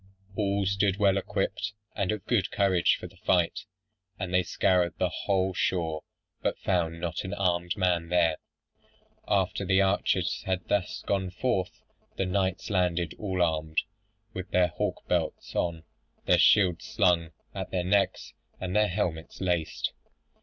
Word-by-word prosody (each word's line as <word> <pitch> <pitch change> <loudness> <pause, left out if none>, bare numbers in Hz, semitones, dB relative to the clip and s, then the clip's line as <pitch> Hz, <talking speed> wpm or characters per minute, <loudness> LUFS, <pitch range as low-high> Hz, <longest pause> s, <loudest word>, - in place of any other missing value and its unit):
All 100 -1 0
stood 100 0 +1
well 100 -2 +4
equipped, 105 +2 -2 0.2
and 100 -1 0
of 105 -2 -4
good 100 -6 +1
courage 95 -3 +3
for - - -8
the 90 +2 -12
fight; 95 +1 +1 0.5
and 95 -2 -4
they 90 - +5
scoured 90 0 +1
the 90 - +1
whole 95 -1 0
shore, 80 -4 0 0.4
but - - 0
found 85 -3 0
not 85 -1 -3
an 95 +2 -4
armed 85 -2 0
man 90 -3 +1
there. 85 -3 +3 0.9
After - - +1
the 95 +1 +4
archers 95 -2 +1
had 95 -1 -1
thus 100 -3 -1
gone 95 -2 0
forth, 95 -2 -2 0.3
the 95 - 0
knights 95 +1 -1
landed 90 -3 +1
all 95 -4 0
armed, 80 -1 -1 0.6
with 95 0 -6
their 90 -1 +3
hauberks 75 - -2
on, 80 -2 -1 0.4
their - - +4
shields 90 -5 +4
slung 85 -2 +2 0.2
at 95 -2 -5
their 90 -1 -1
necks, 100 +2 +1 0.3
and 95 -1 -3
their 105 0 +4
helmets 85 -4 -3
laced. 90 -4 -1
90 Hz, 145 wpm, -28 LUFS, 85-100 Hz, 0.9 s, they